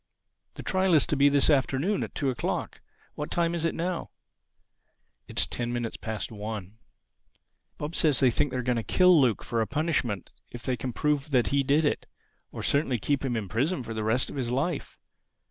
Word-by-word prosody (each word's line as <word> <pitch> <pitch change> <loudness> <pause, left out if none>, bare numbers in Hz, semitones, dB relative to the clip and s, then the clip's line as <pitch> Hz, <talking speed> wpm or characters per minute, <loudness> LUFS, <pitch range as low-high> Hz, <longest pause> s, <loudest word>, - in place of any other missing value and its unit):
The - - -8
trial 185 -2 +2
is 150 - +5
to - - 0
be 140 0 +5
this 140 -1 +3
afternoon 145 +6 +2
at - - -5
two 140 -3 0
o'clock. 125 - -3 0.3
What 150 - -5
time 170 -1 +1
is 170 -1 -1
it 165 - 0
now?" 175 +1 -2 1.2
"It's - - +1
ten 120 0 -3
minutes 120 -2 -3
past 110 -2 -5
one." 105 -1 -6 1.0
"Bob 150 +3 -5
says 150 -6 +2
he 130 -3 +5
thinks 135 +4 +1
they 130 - -2
are 125 - -2
going 125 -1 +1
to - - 0
kill 180 +1 +5
Luke 120 -5 +2
for 115 -1 -1
a 110 - 0
punishment 135 - -1 0.2
if 120 - -9
they 130 - 0
can 125 +2 -4
prove 150 +3 0
that 125 -4 +2
he 140 0 +2
did 145 +4 +2
it—or 145 - -5
certainly 140 -3 +2
keep 140 +6 0
him 130 -3 -1
in 105 -3 -3
prison 135 - 0
for 115 - -6
the 110 -1 -3
rest 110 +4 +1
of - - -7
his 125 -3 -1
life. 140 +6 -2
135 Hz, 200 wpm, -27 LUFS, 120-150 Hz, 1.2 s, is